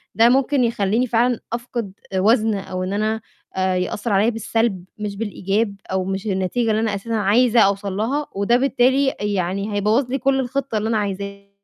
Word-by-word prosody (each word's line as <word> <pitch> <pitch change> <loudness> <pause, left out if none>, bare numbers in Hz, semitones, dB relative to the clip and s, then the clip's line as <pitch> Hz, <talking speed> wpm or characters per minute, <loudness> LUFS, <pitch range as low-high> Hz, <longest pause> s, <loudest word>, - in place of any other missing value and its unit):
ده 230 +2 +6
ممكن 270 0 +2
يخلّيني 230 +2 +1
فعلًا 240 +1 +2
أفقد 235 -4 -4 0.2
وزن 215 +2 +3
أو 185 -1 -4
إن 185 +2 -3
أنا 215 +1 -1 0.3
آآ 185 0 +1
يأثّر 205 +4 -2
عليَّ 210 +5 +3
بالسلب 225 -4 -1
مش 205 -1 -4
بالإيجاب، 205 0 -1 0.2
أو 190 -1 0
مش 195 +1 -3
النتيجة 195 +5 0
اللي 215 +1 +1
أنا 215 -3 0
أساسًا 230 +4 -5
عايزة 225 +3 +3
أوصل 200 -1 +2
لها، 275 +8 -1
وده 200 +5 +3
بالتالي 265 +1 +2
يعني 200 0 -1
هيبوّظ 220 +6 +1
لي 270 - +1
كلّ 270 +1 +1
الخطة 265 -2 -2
اللي 215 +1 -1
أنا 225 - +1
عايزاها، 200 0 -4
215 Hz, 175 wpm, -21 LUFS, 200-240 Hz, 0.3 s, ده